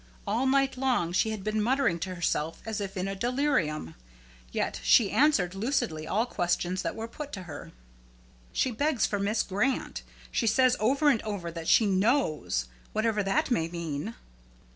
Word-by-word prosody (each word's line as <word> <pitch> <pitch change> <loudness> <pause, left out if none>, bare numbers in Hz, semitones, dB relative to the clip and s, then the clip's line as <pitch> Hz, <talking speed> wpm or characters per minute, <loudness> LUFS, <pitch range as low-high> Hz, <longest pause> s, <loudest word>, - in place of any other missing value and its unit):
All 230 +6 0
night 270 0 +2
long 250 -10 +1
she 185 +5 +2
had 215 -3 -4
been 215 +1 0
muttering 235 -6 +1
to 185 +2 -4
herself 165 -2 -2
as 220 -2 -3
if 195 -1 -5
in 185 +1 -1
a 195 - -2
delirium. 235 - 0 0.6
Yet - - -2
she 220 -5 +5
answered 255 - +3
lucidly 195 - -1
all 215 +7 +1
questions 180 -3 -1
that - - -3
were 225 0 -5
put 290 +5 -8
to 190 - -5
her. 175 - -9 0.8
"She 260 - +1
begs 275 0 +1
for 205 - -1
Miss 210 +3 +1
Grant. 210 +8 -1 0.3
She 230 - 0
says 255 +3 +4
over 275 +7 +2
and 230 -6 +2
over 200 -6 -4
that 165 -1 -7
she 225 - +5
'knows,' 190 - +1 0.3
whatever 215 -1 +1
that 195 +5 0
may 165 -9 +2
mean." 170 +4 -4
210 Hz, 170 wpm, -28 LUFS, 180-250 Hz, 0.8 s, she